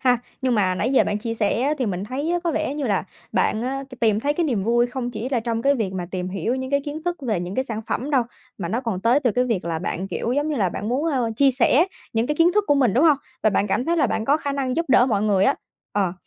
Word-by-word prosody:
ha. 250 -2 +3 0.2
Nhưng 255 -2 +2
mà 185 -3 +2
nãy 230 +8 -1
giờ - - +5
bạn 210 0 -1
chia 230 +1 -3
sẻ 220 +1 0
á, 295 +3 +1
thì 255 - 0
mình 190 -1 -2
thấy 275 +8 -3
á, 350 - +2
có 340 - +2
vẻ 280 - -1
như 290 -3 -2
là 200 -3 0 0.3
bạn 220 - +1
á, 270 +2 -3
t 255 - -12
tìm 220 -2 +3
thấy 290 +3 +1
cái 345 - 0
niềm 235 -10 0
vui 240 +1 +3
không 245 0 -4
chỉ 235 +2 -4
là 250 -4 0
trong 230 0 -2
cái 280 +1 +4
việc 210 -7 -2
mà 180 -2 -4
tìm 185 -1 -3
hiểu 195 +6 -2
những 260 +1 -4
cái 280 - +2
kiến 300 +2 -5
thức 350 0 -1
về 215 -9 -1
những 180 +2 -5
cái 260 - 0
sản 225 -4 -4
phẩm 275 +5 -2
đâu, 265 -3 +3 0.4
mà 175 -4 -3
nó 225 +6 -1
còn 225 -7 -3
tới 240 +7 +3
từ 250 - +2
cái 250 +3 +1
việc 225 -9 -1
là 165 -1 -2
bạn, 185 +2 -3
kiểu 235 - -2
giống 290 +3 0
như 300 - -1
là, 195 -5 +2
bạn 210 +5 -5
muốn, 265 +6 0
ơ, 245 -5 0
chia 275 +2 +5
sẻ 265 +5 +3 0.3
những 225 +1 +1
cái 300 - 0
kiến 335 +2 +4
thức 420 - +3
của 290 - +4
mình, 255 -8 +3
đúng 270 +7 +4
hông? 305 -3 +6 0.3
Và 215 - +4
bạn 200 +1 +1
cảm 245 +5 0
thấy 340 +1 +1
là 285 -5 +3
bạn 220 - -2
có 285 +4 +3
khả 285 -2 -3
năng 270 -1 -2
giúp 335 - +1
đỡ 250 -1 +5
mọi 210 -5 +1
người 200 -3 +3
á, - - +4 0.4
ờ, 195 -4 +1
245 Hz, 315 wpm, -23 LUFS, 210-275 Hz, 0.4 s, hông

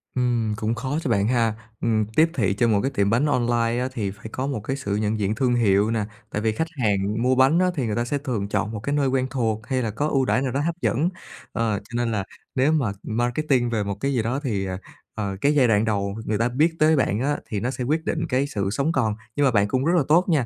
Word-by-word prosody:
Ừm, 120 -4 +1
cũng 110 +2 -1
khó 130 +5 -2
cho 135 - -3
bạn 100 -2 +2
ha, 115 -2 +2 0.3
ừm, 110 -2 +1
tiếp 160 +1 +5
thị 100 - +1
cho 120 +3 +2
một 105 -3 +3
cái 135 - -1
tiệm 100 -6 +1
bánh 120 +7 +2
online 120 -4 +1
á, 130 - 0
thì 105 -6 -2
phải 105 - -16
có 130 +1 -3
một 135 -6 -2
cái 135 +4 -2
sự 105 -7 -2
nhận 105 +1 0
diện 105 +1 0
thương 125 0 +1
hiệu 105 -2 +3
nè. 110 -2 0 0.3
Tại 105 - -2
vì 110 0 +1
khách 160 +10 -2 0.2
hàng 105 +1 +1
mua 130 +1 +3
bánh 135 +6 +4
á, 185 - +4
thì 135 - -1
người 110 -2 -1
ta 120 - 0
sẽ 145 +4 -1
thường 120 -8 -3
chọn 105 +1 -1
một 110 - -4
cái 140 +7 -2
nơi 140 -2 +2
quen 130 0 +1
thuộc 110 -4 -2
hay 130 -1 0
là 110 - -2
có 145 +8 -1
ưu 135 -3 +1
đãi 130 - +2
nào 130 -2 -1
đó 140 - -1
hấp 165 +3 -1
dẫn. 155 +9 +1 0.4
Ờ, 110 -3 0
cho 115 +4 -11
nên 120 -1 0
là 105 -3 -1 0.3
nếu 135 +4 +3
mà 140 -10 +1
marketing 120 +2 0
về 110 -3 0
một 100 -1 -3
cái 140 +4 0
gì 125 - +1
đó 125 +4 -1
thì, 100 -8 -1
ờ, 95 -1 -3 0.4
ờ, 100 -3 -3
cái 145 +1 +3
giai 130 -4 +5
đoạn 110 -1 +3
đầu 100 -2 -1
người 110 - 0
ta 115 +1 +1
biết 155 +7 +2
tới 155 +1 +5
bạn 110 -6 +1
á, 145 +4 0
thì 105 - -2
nó 125 +4 -1
sẽ 130 - -4
quyết 155 +5 0
định 165 0 -1
cái 135 +2 +1
sự 100 -7 -2
sống 140 +8 0
còn. 115 -8 +1 0.2
Nhưng 145 - +2
mà 130 - +4
bạn 100 -2 +3
cũng 130 +5 0
rất 170 - +3
là 160 - +3
tốt 175 +4 +4
nha, 145 -7 +2
120 Hz, 280 wpm, -24 LUFS, 105-135 Hz, 0.4 s, tiếp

